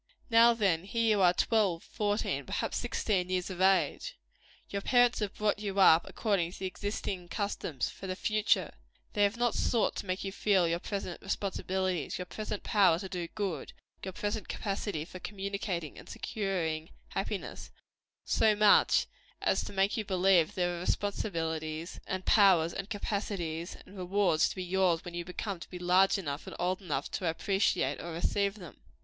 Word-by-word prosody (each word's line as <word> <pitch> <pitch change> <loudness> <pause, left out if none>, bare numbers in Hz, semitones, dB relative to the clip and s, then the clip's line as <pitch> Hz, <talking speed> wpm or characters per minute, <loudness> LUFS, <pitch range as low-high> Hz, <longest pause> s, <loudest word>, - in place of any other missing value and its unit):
Now, 230 +1 +7
then, 190 -6 +1
here 230 +3 0
you - - +2
are, 180 -2 +6
twelve, 190 -3 +1
fourteen, 205 -1 -1
perhaps - - -2
sixteen 185 -4 -1
years 185 0 -1
of 185 0 -5
age. 195 - +2 0.5
Your 200 - -3
parents 245 +2 +4
have 210 -3 -3
brought 210 -1 0
you 200 -2 -3
up 170 -3 +6
according 190 -6 0
to - - -9
the 190 - -5
existing 190 -1 -4
customs, 200 - -2
for 195 - -9
the 185 - -2
future. 215 +1 +1 0.4
They 205 - 0
have 205 +3 +3
not 240 -1 +2
sought 230 -3 +1
to - - -5
make 185 +1 -2
you 195 - -3
feel 190 -3 +2
your 170 +1 0
present 195 -2 -5
responsibilities, 185 -4 -2
your 180 - -4
present 210 +2 -5
power 190 -6 +4
to 190 +2 -5
do 180 -2 -4
good, 190 -9 -3 0.3
your 190 - -4
present 205 +3 -3
capacity 195 -5 -3
for 185 - -10
communicating 195 -4 -4
and - - -13
securing 170 -6 -2 0.2
happiness, - - -4 0.6
so 220 -1 +3
much 210 0 +5 0.3
as - - +1
to - - -7
make 195 +2 +1
you 220 - -1
believe 185 -4 +3
there 175 -1 0
are - - -5
responsibilities, 165 -4 -2
and 185 -1 -3
powers, 185 -6 +5
and 195 +1 -5
capacities, 195 -5 -3
and 195 - -15
rewards, 185 -3 +2
to - - -6
be 185 - -4
yours 180 -2 +1
when 175 - -7
you 175 0 -3
come 185 +1 -4
to - - -10
be 180 - -7
large 180 +3 +4
enough 145 -6 -5
and - - -7
old 185 +2 -1
enough 150 -6 -3
to 180 - -1
appreciate 180 -5 0
or 170 - -6
receive 200 +4 0
them. 180 -7 -12
190 Hz, 175 wpm, -31 LUFS, 175-205 Hz, 0.6 s, Now